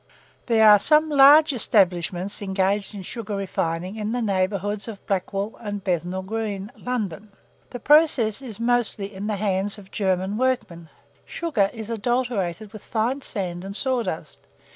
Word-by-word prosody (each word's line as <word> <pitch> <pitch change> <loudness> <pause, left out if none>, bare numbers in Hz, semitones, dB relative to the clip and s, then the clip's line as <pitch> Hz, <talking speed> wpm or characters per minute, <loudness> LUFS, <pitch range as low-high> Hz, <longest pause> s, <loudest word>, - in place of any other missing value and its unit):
There 220 -2 +5
are 210 -1 +8
some 305 +7 +4
large 290 +2 +7
establishments 190 -4 +1
engaged 195 +1 -1
in 195 - -7
sugar 215 +1 -6
refining 185 0 -3
in 215 +1 -3
the 245 - -1
neighbourhoods 200 +1 -1
of 215 -3 -9
Blackwall 195 +2 -3
and 205 -3 -5
Bethnal 180 0 -2
Green, 210 0 -4
London. 215 -6 -4 0.4
The 245 - -7
process 280 -7 +4
is 230 -6 -9
mostly 230 -4 0
in 195 +2 -5
the 215 - -1
hands 200 0 -1
of 195 -2 -14
German 190 0 -1
workmen. 215 -10 -2 0.3
Sugar 265 -13 -1
is 225 -1 -7
adulterated 220 -4 -2
with 215 - -9
fine 240 +5 -1
sand 180 -8 -4
and 195 +1 -7
sawdust. 220 - -2
205 Hz, 145 wpm, -23 LUFS, 190-235 Hz, 0.4 s, are